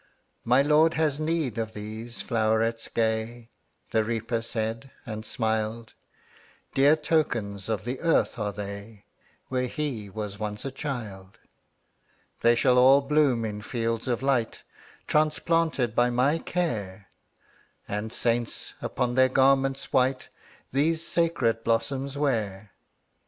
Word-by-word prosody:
``My 130 Hz, +4 st, +4 dB
Lord 155 Hz, +2 st, +4 dB
has 155 Hz, -3 st, +1 dB
need 155 Hz, -7 st, -1 dB
of 110 Hz, -1 st, -3 dB
these 110 Hz, +3 st, -6 dB
flowerets 115 Hz, 0 st, 0 dB
gay,'' 115 Hz, +1 st, -1 dB, 0.4 s
The 110 Hz, -, +2 dB
Reaper 115 Hz, +1 st, -2 dB
said, 115 Hz, +2 st, -3 dB, 0.2 s
and 110 Hz, -3 st, -5 dB
smiled; 110 Hz, 0 st, -2 dB, 0.8 s
``Dear 145 Hz, +3 st, +5 dB
tokens 115 Hz, -, 0 dB
of 105 Hz, -4 st, -1 dB
the 125 Hz, +2 st, -3 dB
earth 165 Hz, -6 st, +1 dB
are 105 Hz, -1 st, -1 dB
they, 100 Hz, +1 st, -8 dB, 0.4 s
Where 125 Hz, -1 st, 0 dB
he 125 Hz, -8 st, -4 dB
was 100 Hz, 0 st, -6 dB
once 105 Hz, +1 st, -4 dB
a 135 Hz, -, -3 dB
child. 110 Hz, -10 st, -6 dB, 1.0 s
``They 120 Hz, 0 st, +4 dB
shall 125 Hz, 0 st, +4 dB
all 135 Hz, +2 st, +7 dB
bloom 140 Hz, -5 st, +2 dB
in 105 Hz, -1 st, -4 dB
fields 115 Hz, 0 st, -2 dB
of 120 Hz, 0 st, -1 dB
light, 130 Hz, -5 st, 0 dB, 0.4 s
Transplanted 155 Hz, -5 st, +1 dB
by 120 Hz, 0 st, +4 dB
my 130 Hz, +6 st, +2 dB
care, 105 Hz, -, -3 dB, 0.8 s
And 105 Hz, +2 st, -3 dB
saints, 120 Hz, -1 st, -1 dB
upon 125 Hz, -1 st, -1 dB
their 130 Hz, +1 st, +4 dB
garments 135 Hz, +1 st, +2 dB
white, 130 Hz, 0 st, +2 dB, 0.4 s
These 160 Hz, +4 st, +1 dB
sacred 135 Hz, -10 st, +1 dB
blossoms 135 Hz, +5 st, -1 dB
wear.'' 105 Hz, -8 st, -1 dB
120 Hz, 125 wpm, -27 LUFS, 110-135 Hz, 1.0 s, all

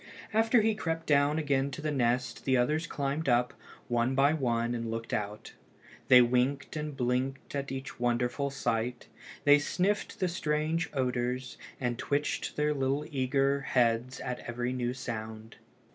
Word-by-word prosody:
After 225 Hz, +2 st, +4 dB
he 220 Hz, +1 st, +2 dB
crept 165 Hz, -6 st, -3 dB
down 145 Hz, 0 st, +3 dB
again 140 Hz, -3 st, +1 dB
to 135 Hz, -, -7 dB
the 155 Hz, 0 st, -2 dB
nest 125 Hz, -3 st, 0 dB
the 130 Hz, -1 st, +3 dB
others 150 Hz, +7 st, +1 dB
climbed 140 Hz, +1 st, -2 dB
up, 120 Hz, 0 st, +2 dB, 0.3 s
one 120 Hz, +2 st, +1 dB
by 140 Hz, +3 st, +4 dB
one, 120 Hz, -5 st, 0 dB
and 115 Hz, -1 st, -3 dB
looked 115 Hz, 0 st, -4 dB
out. 105 Hz, 0 st, -4 dB, 0.5 s
They 125 Hz, -1 st, +8 dB
winked 125 Hz, +5 st, 0 dB
and 150 Hz, -2 st, -4 dB
blinked 130 Hz, +1 st, -1 dB
at 140 Hz, -1 st, -3 dB
each 135 Hz, 0 st, -6 dB
wonderful 120 Hz, +3 st, 0 dB
sight; 120 Hz, -3 st, -2 dB, 0.4 s
they 145 Hz, 0 st, +7 dB
sniffed 190 Hz, +7 st, -1 dB
the 185 Hz, -, +1 dB
strange 155 Hz, 0 st, -1 dB
odors, 125 Hz, -1 st, -1 dB, 0.2 s
and 120 Hz, -2 st, -2 dB
twitched 145 Hz, +1 st, -1 dB
their 150 Hz, 0 st, +1 dB
eager 145 Hz, -, -3 dB, 0.5 s
little 140 Hz, +1 st, +2 dB
heads 120 Hz, -1 st, +1 dB
at 125 Hz, -1 st, -4 dB
every 120 Hz, +1 st, -3 dB
new 125 Hz, 0 st, -2 dB
sound. 110 Hz, -3 st, -6 dB
130 Hz, 155 wpm, -30 LUFS, 120-145 Hz, 0.5 s, They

